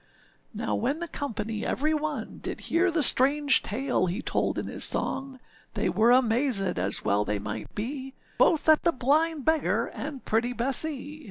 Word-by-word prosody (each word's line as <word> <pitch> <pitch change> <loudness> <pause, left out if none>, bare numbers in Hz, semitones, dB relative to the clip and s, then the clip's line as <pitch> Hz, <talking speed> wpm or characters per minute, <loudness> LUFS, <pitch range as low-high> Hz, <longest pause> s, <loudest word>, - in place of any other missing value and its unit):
â - - -6
Now - - -1
when 270 +6 -1
the 340 +1 -4
company 225 -8 -4
every 305 +3 0
one, 310 0 -4
Did - - -5
hear 355 +3 +1
the 325 -3 +1
strange 280 +2 +4
tale 245 -3 -1
he 180 +5 -3
told - - -1
in - - -3
his - - -5
song, 270 -1 -1 0.4
They - - 0
were 225 +2 +2
amazèd, 245 - +2
as 95 +3 +2
well 100 +1 +2
they 105 0 -2
might 105 +2 -7
be, 265 +4 -5 0.2
Both 320 -2 +3
at 310 -1 +6
the 340 - +2
blind 300 +3 +1
beggar 320 -1 +1
and 285 -3 -7
pretty 230 +3 0
Bessee. 275 +4 -1
265 Hz, 175 wpm, -27 LUFS, 225-300 Hz, 0.4 s, at